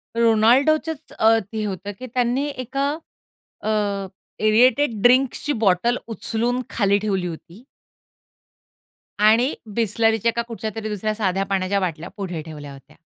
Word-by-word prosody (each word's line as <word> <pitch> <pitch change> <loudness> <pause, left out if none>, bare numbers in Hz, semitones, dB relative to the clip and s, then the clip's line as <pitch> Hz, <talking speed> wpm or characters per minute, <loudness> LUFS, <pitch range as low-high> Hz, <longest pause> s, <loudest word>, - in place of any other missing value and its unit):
रोनाल्डोचच 265 +8 +3
अ, 220 - +5 0.2
ते 220 -1 -3
होतं 200 0 -5
की 255 - -6
त्यांनी 250 +2 +1 0.2
एका 275 +3 -1 0.8
अ, - - -1 0.8
एअरेटेड 235 +1 +3
ड्रिंक्सची 260 +4 +3
बॉटल 205 +6 +3
उचलून 235 +2 -1
खाली 200 -2 +2
ठेवली 190 -3 0
होती. 175 +7 -10 1.5
आणि 225 +6 +4 0.2
बिसलरीच्या 225 0 +2
का 235 - +1
कुठच्यातरी 220 -1 -5
दुसऱ्या 215 +1 -2
साध्या 195 -3 0
पाण्याच्या 195 0 0
बाटल्या 170 -2 -3
पुढे 180 -5 -4
ठेवल्या 150 -3 -9
होत्या. 135 +2 -16
220 Hz, 120 wpm, -22 LUFS, 195-245 Hz, 1.5 s, अ